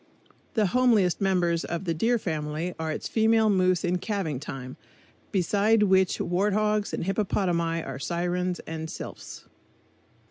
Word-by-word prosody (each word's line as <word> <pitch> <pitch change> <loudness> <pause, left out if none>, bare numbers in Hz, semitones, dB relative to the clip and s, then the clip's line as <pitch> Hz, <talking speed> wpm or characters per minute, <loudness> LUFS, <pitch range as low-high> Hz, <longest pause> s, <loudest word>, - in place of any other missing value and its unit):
The 215 -3 +3
homeliest 210 -4 +3
members 175 -3 +1
of 170 +2 -4
the 170 - 0
Deer 230 +9 +2
Family 160 -2 -3
are 160 -1 -2
its - - -4
female 220 -1 +3
moose 185 -2 +2
in 180 0 0
calving 180 - -2
time, 130 -3 -7 0.6
beside 205 +3 +3
which 190 -2 +3
warthogs 210 +3 0
and - - -3
hippopotami 175 -4 0
are 135 -1 -6
sirens 180 +3 -1
and 160 0 -6
sylphs. - - -8
180 Hz, 135 wpm, -26 LUFS, 165-205 Hz, 0.6 s, The